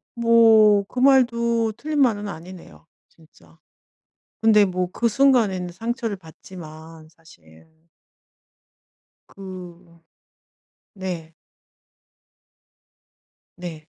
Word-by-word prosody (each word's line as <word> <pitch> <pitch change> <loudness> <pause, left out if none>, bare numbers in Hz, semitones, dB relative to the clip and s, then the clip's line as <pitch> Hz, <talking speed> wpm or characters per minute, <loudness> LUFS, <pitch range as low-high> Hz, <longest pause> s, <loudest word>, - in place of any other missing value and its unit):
뭐 225 -3 +5
그 250 - -6
말도 235 -4 +2
틀린 300 +5 -4
말은 210 -5 +1
아니네요, 165 - -11 0.2
진짜. 85 - -24 0.8
근데 210 -2 +5
뭐 180 -1 -3
그 235 - -1
순간에는 215 -8 +1
상처를 230 +2 -4
받지만 160 -2 -13
사실. 160 - -22 1.4
그 180 -3 -12 0.9
네. 175 -5 -7 2.2
네. 165 -4 -9
185 Hz, 140 characters per minute, -22 LUFS, 165-230 Hz, 2.2 s, 뭐